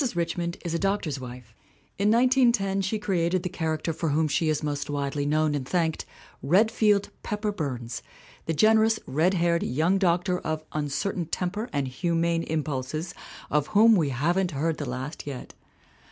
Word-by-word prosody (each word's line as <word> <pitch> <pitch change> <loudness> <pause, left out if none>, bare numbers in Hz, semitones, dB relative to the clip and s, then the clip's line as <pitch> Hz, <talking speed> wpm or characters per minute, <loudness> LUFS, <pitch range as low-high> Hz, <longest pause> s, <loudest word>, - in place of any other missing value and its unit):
Richmond 170 0 -2
is 170 - -2
a 170 - 0
doctor's 195 -8 -1
wife. 125 -3 -10 0.5
In 200 +1 +3
1910 235 -5 +3
she 195 +3 -1
created 185 -3 0
the 180 - -2
character 160 -2 -2
for 160 +1 -2
whom 155 +2 +2
she 155 +2 +1
is 155 -1 0
most 145 -1 -2
widely 145 0 -2
known 155 0 +2
and 145 -2 -1
thanked 165 -3 0 0.4
Redfield 205 +5 +3
Pepper 210 -1 -2
Burns, 125 - -4 0.5
the 165 - +1
gen 215 +8 +5
erous, 220 0 +3
red 165 +7 +1
haired 170 -1 +2
young 160 +10 +1
doctor 180 0 +1
of 155 0 -3
uncertain 155 +4 -2
temper 195 +7 -3
and 140 -2 -1
humane 170 +4 0
impulses 155 +1 -3 0.4
of 150 -1 +2
whom 225 +1 +7
we 160 -7 +2
haven't 175 +8 +1
heard 160 +2 0
the 145 -4 -3
last 130 +5 -5
yet. 135 -3 -7
165 Hz, 165 wpm, -26 LUFS, 145-195 Hz, 0.5 s, whom